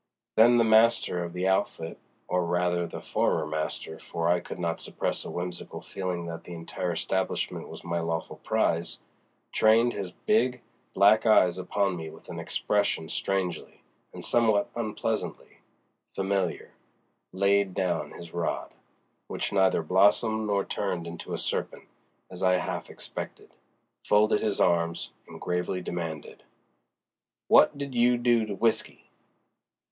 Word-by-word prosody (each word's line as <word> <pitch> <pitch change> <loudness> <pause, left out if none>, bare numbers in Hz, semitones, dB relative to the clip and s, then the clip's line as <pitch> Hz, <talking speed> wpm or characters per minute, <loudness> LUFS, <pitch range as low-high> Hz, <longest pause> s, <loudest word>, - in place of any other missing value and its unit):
Then, 120 +2 +7
the 115 - +5
master 110 -5 +4
of 85 - -5
the 90 +1 -1
outfit 85 -3 -1 0.3
(or 90 0 +1
rather 90 0 0
the - - -7
former 80 - 0
master, 80 +1 -4
for 85 0 -2
I 90 0 +4
could - - -8
not 85 -1 -2
suppress - - -2
a - - -7
whimsical 90 0 -5
feeling 90 -3 -4
that 85 -1 -6
the 90 - -8
entire 85 +2 -3
establishment 95 +3 -2
was - - -9
my 85 0 -2
lawful 80 0 -3
prize) 85 +1 0 0.5
trained 115 +2 +4
his 95 -3 -5
big, 130 - +1 0.3
black 105 +4 +5
eyes 95 -4 +5
upon 100 0 0
me 80 -1 -6
with - - -14
an - - -6
expression 100 -6 0
strangely, 95 -4 -2 0.3
and - - -8
somewhat 110 -4 +2
unpleasantly, 110 -3 -3 0.6
familiar, 95 -2 -1 0.6
laid 100 0 +2
down 85 -5 -1
his 85 -1 -11
rod—which 85 +3 -5
neither 95 -4 +3
blossomed 105 +5 +3
nor 100 -1 +1
turned 90 -4 -2
into 85 0 -7
a - - -1
serpent, - - -3 0.5
as 90 0 -8
I 90 -1 +4
half 90 - -3
expected—folded 105 +1 -2
his 105 -3 0
arms, 85 -1 +1 0.2
and - - -11
gravely 90 +1 -1
demanded, 85 -4 -5 1.1
"W'at - - +6
did 140 -2 -5
you 120 0 +4
do 120 -2 +2
to 100 - -4
W'isky?" 110 +2 0
95 Hz, 135 wpm, -28 LUFS, 85-105 Hz, 1.1 s, Then